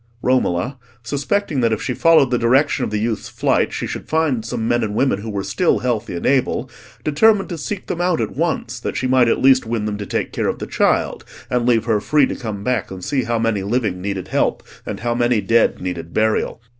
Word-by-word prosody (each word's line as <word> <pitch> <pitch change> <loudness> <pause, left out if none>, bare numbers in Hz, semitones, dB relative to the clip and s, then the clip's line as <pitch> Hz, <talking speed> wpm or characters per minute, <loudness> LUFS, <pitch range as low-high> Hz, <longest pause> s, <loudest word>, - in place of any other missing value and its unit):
Romola, 125 0 0 0.2
suspecting 145 - -1
that 115 -1 +2
if 110 - 0
she 125 - -2
followed 160 -3 +4
the 125 - +2
direction 130 +5 +2
of - - -1
the 105 - -2
youth's 110 0 -2
flight, - - +1
she - - -3
should - - -6
find 155 -8 +1
some 115 0 -3
men 120 0 +1
and 105 -1 -3
women 110 -5 +1
who 110 - -6
were 100 -2 -3
still 110 - +1
healthy 115 -3 -2
and 85 - -5
able, 135 -2 +1 0.3
determined 195 +7 +3
to 175 - -3
seek 185 +5 -5
them 175 - -3
out 175 -2 +1
at - - -3
once, 140 -6 -2
that - - -4
she 130 - -1
might 130 -1 +4
at - - +2
least 130 -3 +5
win 115 -2 -2
them 105 -1 -3
to 100 - -4
take - - -2
care - - -1
of - - -1
the - - -5
child, - - 0 0.3
and 125 -1 +1
leave 115 -2 +3
her 110 -3 +1
free 150 +3 +3
to - - -4
come 105 -4 -5
back 125 -2 -1
and 95 -1 -8
see 135 -4 0
how 115 0 0
many 115 -3 0
living 100 -3 -1
needed 95 -1 -4
help, - - 0 0.2
and - - -5
how 120 0 0
many 120 -1 +2
dead 115 +3 +2
needed 85 -2 -5
burial. 110 +1 +1
120 Hz, 230 wpm, -20 LUFS, 105-135 Hz, 0.3 s, least